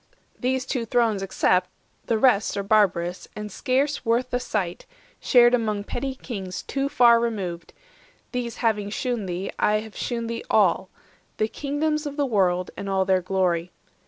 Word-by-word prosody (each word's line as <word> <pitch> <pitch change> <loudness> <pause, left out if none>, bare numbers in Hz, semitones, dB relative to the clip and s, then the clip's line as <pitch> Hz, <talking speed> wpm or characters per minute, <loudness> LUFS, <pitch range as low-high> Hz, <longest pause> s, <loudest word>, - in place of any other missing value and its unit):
These 260 +1 0
two 255 -3 -2
thrones 225 -3 +1
except, 185 -1 +1 0.4
The 230 - +2
rest 220 -4 +3
are 200 - -1
barbarous, 185 -4 +1
and 210 0 -6
scarce 275 +6 0
worth 235 +2 +1
the 245 - +1
sight, 190 -8 -3 0.3
Shared 240 -2 +5
among 215 -4 0
petty 260 +5 -4
kings 190 -8 -6
too 275 0 -2
far 235 -3 +6
removed; 190 -8 -3 0.6
These 240 -2 -3
having 210 -3 +1
shewn 235 -2 -2
thee, 180 +2 -3
I 210 - +3
have 220 -1 -11
shewn 235 -2 -3
thee 230 0 -4
all - - +3 0.5
The 215 - +1
kingdoms 300 +4 -2
of 285 0 -7
the 290 - +2
world, 185 -7 +1
and 200 - -5
all 190 -1 +1
their 185 -1 +2
glory. 180 -2 0
220 Hz, 160 wpm, -24 LUFS, 190-250 Hz, 0.6 s, far